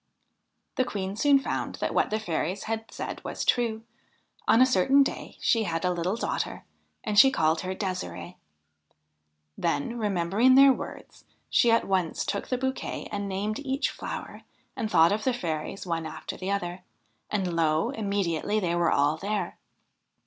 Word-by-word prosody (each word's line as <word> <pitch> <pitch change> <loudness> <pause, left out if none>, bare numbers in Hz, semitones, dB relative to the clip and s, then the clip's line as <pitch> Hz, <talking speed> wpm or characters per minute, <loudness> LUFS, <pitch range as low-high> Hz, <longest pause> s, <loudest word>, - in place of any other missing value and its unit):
The 255 - +4
Queen 195 -5 -4
soon 280 +5 +5
found 270 - -3
that - - -2
what - - +2
the 215 - -1
fairies 185 -1 -2
had 225 0 -4
said - - -6
was - - -4
true. 225 -2 +1 0.6
On 225 - +5
a 255 - +8
certain 260 +4 +4
day - - -5
she 230 - +2
had 165 0 -2
a 180 - +2
little 175 +3 -1
daughter, - - -3 0.4
and 210 -1 +3
she 270 - +9
called 160 -9 +1
her 185 0 -4
Ddsirde. 90 - -4 1.2
Then, 240 +7 -1
remembering 205 +5 +3
their 275 0 +8
words, - - -9 0.3
she 240 - +4
at 230 0 +3
once 185 -4 0
took 200 - -3
the 255 - -1
bouquet 265 +1 -3
and 200 -1 -3
named 205 +4 -2
each 275 0 -1
flower - - -7 0.3
and 220 - -2
thought 165 -3 +5
of 215 +1 -1
the 260 - +1
fairies 165 -3 -4
one 165 -2 -2
after - - -7
the 185 - -5
other, 180 -2 -2 0.5
and 185 -5 -1
lo 160 +7 +2
I - - -9
immediately 200 -1 0
they 175 -4 -1
were 175 -1 +2
all 145 +2 +2
there. 200 0 -3
200 Hz, 170 wpm, -27 LUFS, 170-230 Hz, 1.2 s, she